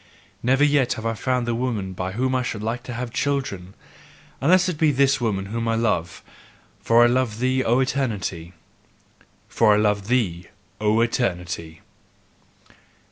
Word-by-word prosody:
Never 135 +4 +2
yet 145 -3 +3
have 110 - -7
I 115 - 0
found 125 +2 -1
the 120 - -1
woman 115 -6 -2
by 95 +1 -4
whom 130 +4 0
I 130 - +1
should 110 -4 -4
like 115 +3 -2
to 125 - -6
have 120 0 -5
children, 100 -10 -2 0.7
unless 180 +6 +4
it 170 -5 -3
be 155 -2 +4
this 135 0 +2
woman 100 -5 -1
whom 115 +3 -3
I 115 - +1
love: 100 -7 -1 0.6
for 115 +1 +5
I - - +7
love 120 -2 +1
thee, 130 +2 +1
O 120 +3 +2
Eternity! 105 -10 -2 0.9
FOR 110 -2 +3
I - - +2
LOVE 105 -2 +1
THEE, 95 -9 0 0.3
O 105 +1 +2
ETERNITY! 90 -9 -2
115 Hz, 160 wpm, -23 LUFS, 100-130 Hz, 0.9 s, I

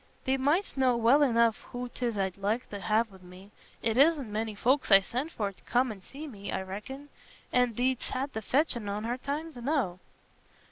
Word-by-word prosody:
"Thee 265 - +1
mightst 285 +4 0
know 255 -2 +4
well 235 +6 +5
enough 235 -5 +3
who 245 0 -3
'tis 240 -2 -3
I'd 190 -2 -1
like 210 +5 -1
t' 205 - -5
ha' 215 +3 +2
wi' 190 - -14
me. 185 +3 -14 0.3
It 225 +2 +1
isna 300 0 +5
many 215 -1 -3
folks 260 +6 +2
I 195 -2 +9
send 255 +10 -4
for 205 -2 -2
t' 195 - -23
come 250 0 +2
an' 200 -3 -9
see 280 +10 -9
me. 205 -8 -7
I 190 - -2
reckon. 240 +10 -8 0.4
An' 250 -2 +3
thee'st 255 +1 0
had 270 +2 -3
the 220 - -3
fetchin' 240 -3 +1
on 205 +1 -3
her 240 +3 -2
times 300 +2 -4
enow." 240 - -1
240 Hz, 200 wpm, -29 LUFS, 210-270 Hz, 0.4 s, I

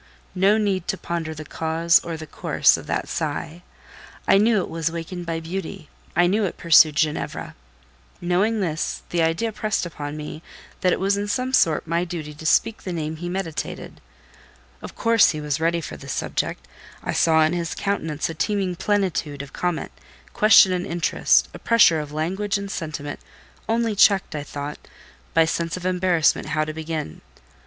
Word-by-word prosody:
No 195 +3 +3
need 195 -4 0
to 190 - -1
ponder 165 -3 -4
the 155 0 -8
cause 165 +2 +2
or 165 -1 -5
the 155 - -8
course - - +2
of - - -8
that - - -2
sigh; 160 +2 -4 0.7
I 195 - +6
knew 220 +1 +4
it 185 - -1
was 165 -1 -2
wakened 170 +1 -6
by 165 -1 -2
beauty; 180 0 -6 0.3
I 175 +2 +5
knew 205 +5 +2
it 185 - -4
pursued 160 -2 +6
Ginevra. 155 0 -2 0.7
Knowing 195 +5 +1
this, 165 -3 -2
the 175 - +1
idea 165 +8 +1
pressed 215 -2 -1
upon 150 -3 -6
me 150 +1 -7 0.4
that 180 - +2
it - - 0
was 195 +1 +1
in 205 0 -2
some 255 +5 -1
sort 160 -10 +3
my 170 +1 0
duty 165 -4 -6
to 155 +2 -11
speak 225 +6 +2
the 185 - -5
name 160 -2 -3
he 175 +2 -5
meditated. 175 -4 -5 0.8
Of - - -9
course 230 -2 +4
he 155 - -2
was 150 0 -2
ready 170 +1 +1
for - - -7
the 140 - -12
subject: - - -3 0.4
I - - -2
saw 160 -1 +4
in 155 +2 +2
his 170 -1 -3
countenance 165 -7 -2
a 165 - -5
teeming 190 +1 -1
plenitude 170 -8 -1
of 140 - -13
comment, 175 -2 -2 0.4
question 210 -3 +7
and 180 0 -2
interest; 170 0 +2
a - - -9
pressure 210 -9 +5
of 150 -1 -6
language 190 +7 -1
and 200 -1 -6
sentiment, 150 -3 -5 0.5
only 230 -1 +1
checked, 200 -2 +4
I 150 - -2
thought, 145 0 -6 0.6
by 165 0 +6
sense 165 +1 -2
of 180 - -8
embarrassment 180 -3 +2
how 155 0 0
to 155 - -5
begin. 160 - -5
170 Hz, 180 wpm, -23 LUFS, 155-195 Hz, 0.8 s, question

